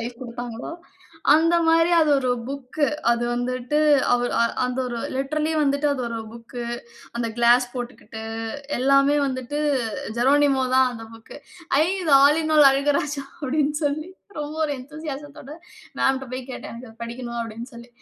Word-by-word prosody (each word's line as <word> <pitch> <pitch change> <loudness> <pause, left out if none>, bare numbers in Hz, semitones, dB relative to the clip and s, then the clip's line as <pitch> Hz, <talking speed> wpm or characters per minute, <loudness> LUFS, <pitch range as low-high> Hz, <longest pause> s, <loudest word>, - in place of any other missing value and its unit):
Life 235 +2 -6
கொடுத்தாங்களோ, 240 +3 -6 0.6
அந்த 330 +2 +4
மாதிரி 330 +1 +4
அது 310 -2 +3
ஒரு 255 -2 0 0.2
புக்கு. 280 +2 -2 0.3
அது 235 0 -1
வந்துட்டு, 255 +4 -1 0.3
அவரு 245 0 +1 0.3
அந்த 250 +1 -2
ஒரு 240 -1 -4 0.2
லிட்டர்லி 305 +4 -1
வந்துட்டு 280 +1 +1
அது 270 - -3
ஒரு 230 -1 -4
புக்கு, 235 +1 -8 0.5
அந்த 235 -1 -1
கிளாஸ் 240 +1 +5
போட்டுக்கிட்டு 240 -2 -7 0.6
எல்லாமே 275 +2 +4
வந்துட்டு 260 +2 -3 0.6
ஜெரோனிமோ 275 +1 +3
தான். 260 -1 +5
அந்த 225 -1 -8
புக்கு. 225 +4 -13 0.5
ஐ! - - +4 0.2
இது 310 -4 +1
ஆல் 300 +3 +5
இன் 310 0 0
ஆல் 290 -2 +9
அழகுராஜா 280 +1 0 0.2
அப்படின்னு. 295 +2 0
சொல்லி 305 +4 -3 0.3
ரொம்ப 300 +1 -5
ஒரு 305 - 0
என்தூசியாசத்தோட 290 0 -8 0.5
மேம் 270 - +3
கிட்ட 265 - -6
போய் 255 0 -4
கேட்டேன். 255 - -7
"எனக்கு 235 +1 -9
அதை 225 - -16
படிக்கணும்" 235 0 -6
அப்படின்னு 230 +1 -7
சொல்லி. 235 +1 -12
265 Hz, 155 wpm, -23 LUFS, 240-290 Hz, 0.6 s, ஆல்